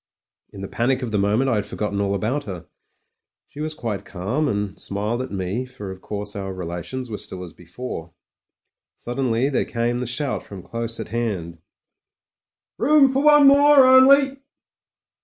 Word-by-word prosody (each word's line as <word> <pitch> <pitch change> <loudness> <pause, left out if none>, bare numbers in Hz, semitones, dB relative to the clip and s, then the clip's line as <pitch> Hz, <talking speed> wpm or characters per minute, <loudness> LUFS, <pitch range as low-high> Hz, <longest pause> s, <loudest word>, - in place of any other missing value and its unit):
In 100 - -11
the 100 - -5
panic 130 +4 0
of 120 - -4
the 105 - +1
moment 105 +7 +2
I 120 -4 +2
had 105 - -2
forgotten 100 -1 -3
all 100 0 0
about 120 +9 -2
her. 90 -5 -7 0.8
She 145 - -14
was 155 0 -3
quite 105 -8 -4
calm, 100 +10 -2
and 105 -5 -3
smiled 105 +5 -2
at 130 - -6
me, 95 +5 -2
for 105 -6 -8
of 95 0 -10
course 105 0 -6
our 95 -1 -4
relations 90 +8 -5
were 105 - -4
still 90 -1 -6
as 85 -4 -10
before. 90 -1 -8 0.9
Suddenly 120 +1 -1
there 135 - +1
came 120 +1 -2
the 125 - -3
shout 135 +3 -2
from 95 -3 -11
close 115 +2 -5
at - - -6
hand, 95 -8 -3 1.2
"Room 275 +1 +5
for 270 +2 +1
one 295 -1 +7
more 285 0 +7
only." 270 +1 +6
115 Hz, 170 wpm, -22 LUFS, 100-135 Hz, 1.2 s, one